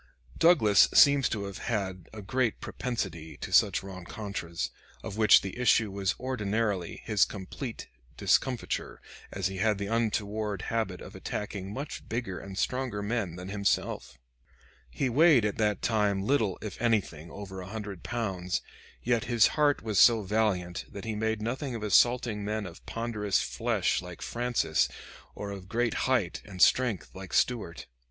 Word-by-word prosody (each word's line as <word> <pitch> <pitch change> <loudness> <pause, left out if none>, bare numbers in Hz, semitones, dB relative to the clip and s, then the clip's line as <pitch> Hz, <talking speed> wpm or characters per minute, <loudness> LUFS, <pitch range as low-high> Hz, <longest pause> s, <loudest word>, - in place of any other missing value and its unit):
Douglas 110 - +6
seems 140 -3 +6
to 105 -3 -2
have 100 -1 -6
had 95 -6 -3
a 110 -2 -9
great 125 +2 0
propensity 95 -10 -4
to - - -6
such - - +4
rencontres, 95 -2 -5 0.3
of 95 - -6
which 110 -1 +6
the 95 - -6
issue 115 -4 +3
was 100 0 -1
ordinarily 105 -6 -2
his 105 -2 +3
complete 110 +5 -5 0.3
discomfiture, 130 -3 0 0.3
as 95 -1 -4
he 95 0 -1
had 105 +1 +2
the 100 - -3
untoward 105 -2 -1
habit 110 -6 -1
of - - -10
attacking 100 -2 -5
much 140 +7 -6
bigger 115 -6 -3
and 95 -1 -9
stronger 125 -3 -1
men 100 -5 -2
than 90 +1 -7
himself. 100 -10 -1 0.7
He 130 - -1
weighed 140 -2 +5
at 105 - -1
that 105 -2 +1
time 105 -4 +1
little, 110 -7 +1
if 105 0 -6
anything, 100 -9 0
over 95 0 -8
a 90 - -8
hundred 105 -4 -6
pounds, 95 -6 -2 0.4
yet 120 -2 +1
his 120 -3 +4
heart 145 -4 +2
was 110 -3 +1
so 115 -3 +6
valiant 95 -4 0
that 100 +1 -8
he 110 - -2
made 110 0 -1
nothing 130 +3 -3
of 110 - -5
assaulting 115 0 +3
men 105 +1 -2
of 85 -2 -10
ponderous 110 -4 -1
flesh - - 0
like 90 -1 -9
Francis, 120 0 0 0.5
or 100 -1 -5
of 95 -2 -9
great 115 +1 0 0.2
height 115 -10 +1
and 95 -3 -11
strength 120 -3 +3
like 95 0 -9
Stuart. 105 -9 0
105 Hz, 155 wpm, -29 LUFS, 95-115 Hz, 0.7 s, Douglas